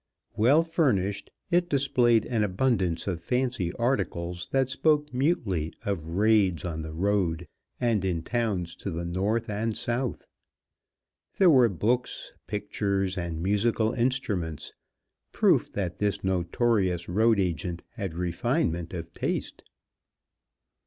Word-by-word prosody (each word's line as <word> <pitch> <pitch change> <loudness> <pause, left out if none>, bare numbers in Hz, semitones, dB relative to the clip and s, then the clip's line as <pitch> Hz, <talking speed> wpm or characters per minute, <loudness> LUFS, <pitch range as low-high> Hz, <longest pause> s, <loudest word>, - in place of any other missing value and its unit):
Well 135 +9 +5
furnished, 105 - 0 0.2
it 175 0 +2
displayed 125 -5 +3
an 115 -4 0
abundance 95 -4 0
of 90 -4 -3
fancy 125 -3 -1
articles 90 -8 -1
that 135 -1 +2
spoke 150 +1 +1
mutely 115 - 0
of 100 -6 -1
raids 95 -2 +2
on 80 -2 -3
the 80 0 -6
road 90 -1 0 0.3
and 115 -5 +1
in 85 -4 -1
towns 100 -6 -1
to - - -5
the 85 -1 -4
north 100 +6 -1
and 110 +1 -2
south. 120 +1 -2 1.1
There 185 -3 +6
were 125 -5 +6
books, 120 +7 -1
pictures, 100 -1 -1
and 85 -3 -4
musical 110 +3 +1
instruments, 105 - -1 0.6
proof - - +3
that 90 -4 -3
this 100 -1 0
notorious 95 0 +1
road 110 +4 +3
agent 85 -1 -2
had 95 -8 -5
refinement 85 - -1
of 85 0 -7
taste. - - -3
100 Hz, 120 wpm, -27 LUFS, 85-120 Hz, 1.1 s, There